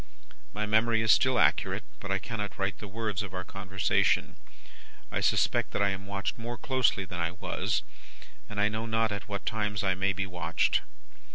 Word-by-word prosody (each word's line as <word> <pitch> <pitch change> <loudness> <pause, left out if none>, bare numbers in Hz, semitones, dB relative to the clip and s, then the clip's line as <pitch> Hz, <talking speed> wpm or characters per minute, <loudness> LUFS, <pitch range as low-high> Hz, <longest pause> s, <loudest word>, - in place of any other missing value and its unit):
"My 105 +1 -2
memory 110 +1 +3
is 110 - +5
still 130 +3 +4
accurate, - - +2 0.2
but 100 - -7
I 95 - +2
cannot 105 0 -4
write 95 0 -1
the 105 - -7
words 105 -1 -2
of 95 -2 -6
our 95 - -3
conversation. 95 -1 +1 0.8
I - - 0
suspect - - +2
that - - +2
I 100 - +4
am 95 0 -4
watched 100 +2 -3
more 120 +1 -5
closely 125 -4 +1
than 90 -1 -6
I 85 +1 -1
was, - - -1 0.7
and 105 - -5
I 105 - +4
know 110 +2 -3
not 115 -1 +1
at 100 0 -5
what 100 -1 -4
times 105 -2 -1
I 95 -1 +3
may 95 +1 +1
be 100 0 -2
watched. 90 -1 +1
100 Hz, 190 wpm, -29 LUFS, 95-110 Hz, 0.8 s, is